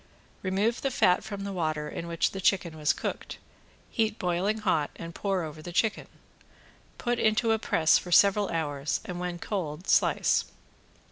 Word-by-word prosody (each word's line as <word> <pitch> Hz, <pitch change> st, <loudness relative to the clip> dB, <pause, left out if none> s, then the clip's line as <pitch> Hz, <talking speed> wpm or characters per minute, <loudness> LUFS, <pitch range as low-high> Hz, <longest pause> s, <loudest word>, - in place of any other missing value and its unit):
Remove 200 Hz, +5 st, 0 dB
the 275 Hz, -, 0 dB
fat 190 Hz, -8 st, +3 dB
from 200 Hz, -2 st, -6 dB
the 200 Hz, 0 st, -4 dB
water 155 Hz, -4 st, -2 dB
in 170 Hz, -, -6 dB
which 170 Hz, -1 st, 0 dB
the 195 Hz, -, -5 dB
chicken 180 Hz, -4 st, +1 dB
was 150 Hz, -1 st, +2 dB
cooked, -, -, -5 dB, 0.5 s
heat 220 Hz, -2 st, 0 dB
boiling 185 Hz, +4 st, 0 dB
hot 155 Hz, -8 st, +1 dB
and 170 Hz, 0 st, -8 dB
pour 195 Hz, -2 st, -1 dB
over 155 Hz, -1 st, -7 dB
the 175 Hz, -, -7 dB
chicken. 215 Hz, +5 st, 0 dB, 0.9 s
Put 240 Hz, -1 st, -1 dB
into 220 Hz, +1 st, +2 dB
a 220 Hz, -, +2 dB
press 160 Hz, -6 st, +3 dB
for 180 Hz, -, -9 dB
several 200 Hz, +3 st, +5 dB
hours 145 Hz, -3 st, -2 dB
and 180 Hz, -1 st, -5 dB
when 180 Hz, -1 st, -3 dB
cold 170 Hz, -3 st, -4 dB
slice. -, -, +3 dB
180 Hz, 165 wpm, -28 LUFS, 165-210 Hz, 0.9 s, several